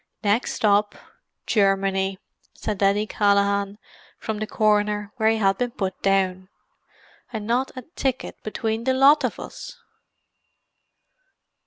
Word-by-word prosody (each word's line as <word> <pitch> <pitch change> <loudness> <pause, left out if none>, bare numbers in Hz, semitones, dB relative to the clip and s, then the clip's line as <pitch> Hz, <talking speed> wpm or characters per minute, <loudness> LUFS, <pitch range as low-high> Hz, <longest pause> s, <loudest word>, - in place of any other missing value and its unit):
"Next 210 +4 +1
stop, 205 -1 +2 0.5
Germany!" 195 -2 +1 0.4
said 210 -2 -4
Denny 200 +1 +2
Callaghan 200 -1 +1 0.4
from 220 -1 -4
the 215 - -3
corner 210 -1 +1
where 220 -1 +3
he 225 - +2
had 195 -2 +2
been 245 -1 0
put 190 -5 -4
down. 185 -1 +1 0.8
"And 220 -3 -5
not 245 +4 0
a 255 - -7
ticket 265 -4 -4
between 220 +1 -3
the 260 0 +2
lot 280 +3 +6
of - - -2
us!" - - -9
210 Hz, 125 wpm, -23 LUFS, 195-225 Hz, 0.8 s, lot